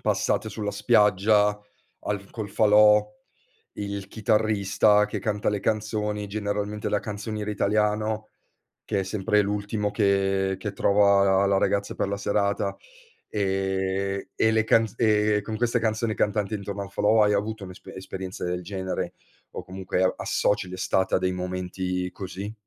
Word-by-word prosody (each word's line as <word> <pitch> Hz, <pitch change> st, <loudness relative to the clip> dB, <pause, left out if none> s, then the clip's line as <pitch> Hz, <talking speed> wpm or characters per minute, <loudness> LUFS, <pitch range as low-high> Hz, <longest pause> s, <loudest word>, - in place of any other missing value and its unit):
passate 110 Hz, -, 0 dB
sulla 105 Hz, 0 st, -4 dB
spiaggia 105 Hz, -1 st, +3 dB, 0.4 s
al 100 Hz, -1 st, -4 dB
col 110 Hz, -3 st, -5 dB
falò, 105 Hz, 0 st, +5 dB, 0.7 s
il 100 Hz, -1 st, -5 dB
chitarrista 105 Hz, -2 st, +2 dB
che 105 Hz, -, -4 dB
canta 105 Hz, 0 st, -1 dB
le 105 Hz, -1 st, 0 dB
canzoni, 105 Hz, -1 st, -1 dB
generalmente 105 Hz, 0 st, -3 dB
la 105 Hz, -, +1 dB
canzoniera 105 Hz, 0 st, -4 dB
italiano, 105 Hz, +1 st, 0 dB, 0.6 s
che 100 Hz, -, -1 dB
è -, -, -1 dB
sempre 105 Hz, +1 st, +1 dB
l'ultimo 105 Hz, +1 st, -2 dB
che 95 Hz, -2 st, +1 dB
che 100 Hz, +1 st, -4 dB
trova 100 Hz, 0 st, +4 dB
la 95 Hz, 0 st, +3 dB
la 100 Hz, 0 st, +3 dB
ragazza 100 Hz, +1 st, 0 dB
per -, -, -1 dB
la 100 Hz, -, -2 dB
serata, 100 Hz, 0 st, 0 dB, 0.5 s
ehm, 95 Hz, -1 st, -1 dB
e 110 Hz, -, +3 dB
le 110 Hz, -1 st, +2 dB
canz 115 Hz, -1 st, +2 dB
ehm, 105 Hz, -2 st, +2 dB
con 110 Hz, +1 st, -5 dB
queste 120 Hz, +1 st, +1 dB
canzoni 110 Hz, 0 st, 0 dB
cantanti 105 Hz, 0 st, 0 dB
intorno 100 Hz, 0 st, -4 dB
ai 100 Hz, -, -7 dB
falò 105 Hz, +3 st, +3 dB
hai 105 Hz, 0 st, +3 dB
avuto 105 Hz, 0 st, -2 dB
un'espe 90 Hz, -1 st, -11 dB
esperienza 95 Hz, 0 st, -7 dB
del 90 Hz, 0 st, -2 dB
genere 95 Hz, 0 st, -4 dB, 0.4 s
o -, -, -6 dB
comunque 95 Hz, 0 st, -3 dB
a 95 Hz, -, +2 dB
associ 100 Hz, -2 st, 0 dB
l'estate 95 Hz, +1 st, 0 dB
a -, -, +2 dB
dei 90 Hz, 0 st, 0 dB
momenti 90 Hz, 0 st, -3 dB
così? 100 Hz, +2 st, -6 dB
100 Hz, 150 wpm, -25 LUFS, 95-105 Hz, 0.7 s, falò